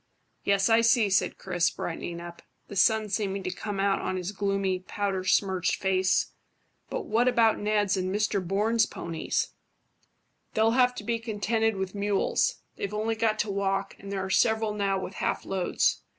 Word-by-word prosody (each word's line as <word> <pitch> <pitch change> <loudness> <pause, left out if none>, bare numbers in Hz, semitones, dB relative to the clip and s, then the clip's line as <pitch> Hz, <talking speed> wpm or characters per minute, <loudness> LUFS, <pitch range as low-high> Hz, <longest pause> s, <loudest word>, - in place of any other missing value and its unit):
"Yes, 200 -1 +3
I 225 0 +5
see," 230 -3 +3
said 190 - +1
Chris, 175 -3 0
brightening 170 0 -5
up, 170 0 -9 0.3
the - - -7
sun 220 +3 +3
seeming 195 -1 -1
to 185 - -2
come 200 +2 -5
out 195 0 +2
on 185 - -2
his 180 +1 -3
gloomy, 195 -2 -1
powder 190 0 -3
smirched 185 -1 +2
face. 190 -1 +1 0.6
"But - - -3
what 235 +3 +2
about 230 -3 +4
Ned's 205 -2 +1
and 185 0 -1
Mr 205 -1 0
Bourne's 215 +5 +2
ponies?" 165 -1 -2 1.1
"They'll 220 +1 +4
have 250 +1 +3
to - - -6
be 230 +2 -1
contented 225 0 0
with 190 -1 -3
mules. 200 -1 0
They've 200 - -3
only 220 +2 0
got 220 -1 +1
to 210 - -3
walk, 195 0 -1
and 200 0 -9
there 190 -1 -2
are 190 - -5
several 220 -1 +2
now 200 -2 0
with 190 - -6
half - - -2
loads. 190 -2 0
200 Hz, 175 wpm, -27 LUFS, 190-220 Hz, 1.1 s, I